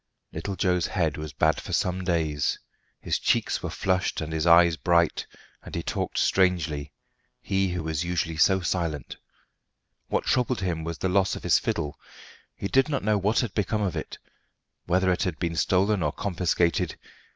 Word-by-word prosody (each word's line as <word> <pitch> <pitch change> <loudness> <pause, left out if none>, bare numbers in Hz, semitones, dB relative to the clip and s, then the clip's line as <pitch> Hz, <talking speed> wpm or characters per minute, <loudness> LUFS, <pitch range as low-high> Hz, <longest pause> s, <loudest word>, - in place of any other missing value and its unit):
Little 100 - -4
Joe's 90 -3 +1
head 80 -5 0
was 75 0 -6
bad 80 +3 +1
for - - -7
some 90 0 0
days. 80 -5 0 0.4
His - - -1
cheeks - - +1
were - - -3
flushed 95 -1 0
and 80 0 -4
his 80 +1 0
eyes 85 0 +6
bright, 85 -1 +1 0.3
and - - -9
he - - -2
talked - - -3
strangely 85 -6 +1 0.5
he 95 0 0
who 90 -2 -3
was 80 0 -2
usually 85 -2 -2
so 95 +4 +4
silent. 85 -6 -2 0.9
What - - 0
troubled 125 -3 +1
him 85 -4 -2
was 85 0 -4
the 95 - -1
loss 95 +1 +2
of - - -8
his - - +4
fiddle; 75 -2 -3 0.6
he 100 - -4
did 135 +7 +3
not 140 - -1
know 105 0 +2
what 105 +4 +2
had 115 -7 -3
become 105 +1 0
of 95 - -1
it, - - -5 0.7
whether 95 +1 +2
it 90 - 0
had 90 -5 -1
been 85 -1 -2
stolen 95 +4 +2
or - - +1
confiscated. 90 -3 0
90 Hz, 175 wpm, -26 LUFS, 80-95 Hz, 0.9 s, eyes